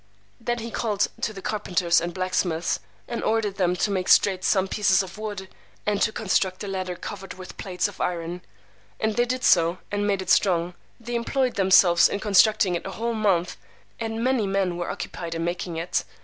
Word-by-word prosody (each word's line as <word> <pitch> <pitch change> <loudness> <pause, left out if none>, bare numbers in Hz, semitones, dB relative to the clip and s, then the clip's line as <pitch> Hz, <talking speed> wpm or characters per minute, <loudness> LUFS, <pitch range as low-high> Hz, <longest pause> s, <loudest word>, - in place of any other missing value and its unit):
Then 240 0 -2
he 230 0 -6
called 210 -4 0
to - - 0
the 195 -3 -10
carpenters 180 -5 +1
and 170 +1 -3
blacksmiths, 180 -2 -1 0.3
and 235 - -4
ordered 215 -3 0
them 180 -2 +2
to 200 +3 0
make 185 -2 -1
straight 190 -2 +4
some 190 -2 +2
pieces 195 -1 +2
of 190 +2 -10
wood, 205 -3 -5 0.4
and 210 -1 0
to 220 - +3
construct 190 -2 0
a - - -5
ladder 185 -2 -3
covered 195 0 -8
with 185 0 -10
plates 185 0 -1
of 205 - -9
iron. 175 0 -2 0.6
And 220 -1 0
they 240 - +3
did 255 +1 -3
so, 170 0 +4
and 205 0 0
made 195 -2 0
it 180 - -1
strong. 175 -2 +3 0.3
They 240 +1 -7
employed 250 +2 0
themselves 185 -2 +5
in 200 - -2
constructing 205 -1 +4
it 175 - -3
a - - -5
whole 235 +1 -2
month, 190 - +1 0.4
and 225 0 -3
many 255 -5 +1
men 195 -2 0
were 175 0 -4
occupied 170 -1 -5
in 165 0 -2
making 175 -1 -3
it. 165 +2 -1
195 Hz, 195 wpm, -25 LUFS, 180-215 Hz, 0.6 s, themselves